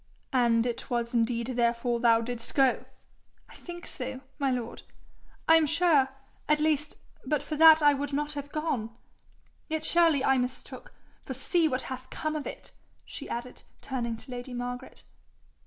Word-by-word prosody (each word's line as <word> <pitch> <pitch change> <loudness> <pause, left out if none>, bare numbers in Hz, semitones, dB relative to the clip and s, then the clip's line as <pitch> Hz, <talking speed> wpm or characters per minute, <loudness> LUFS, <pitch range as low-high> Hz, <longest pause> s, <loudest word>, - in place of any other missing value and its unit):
'And 235 -2 +3
it 240 +1 -4
was 235 -1 -1
indeed 235 0 +1
therefore 235 -1 0
thou 230 -1 +4
didst 235 0 -5
go?' 270 -3 +3 0.6
'I - - -15
think 345 0 -9
so, 260 0 -5 0.2
my 275 -1 +1
lord. 245 -2 -3 0.7
I 325 - +8
am 315 -2 +2
sure, 315 -4 +3 0.4
at 300 0 +4
least, 300 -1 0 0.3
but 290 +1 -1
for 310 - -4
that 320 0 +8
I 290 0 +7
would 285 0 -3
not 295 +1 -2
have 285 0 -6
gone. 260 -8 -3 0.7
Yet 315 0 -2
surely 330 -6 +4
I 265 -1 +4
mistook, 255 - -5 0.3
for - - -6
see 340 -3 +2
what 260 -3 -1
hath 260 0 -7
come 310 0 -3
of 300 - -4
it,' - - -9 0.3
she - - -7
added, 240 +1 -6 0.2
turning 235 -4 -3
to 255 +3 -11
lady 245 0 -6
Margaret. 245 +1 -6
265 Hz, 165 wpm, -28 LUFS, 240-300 Hz, 0.7 s, I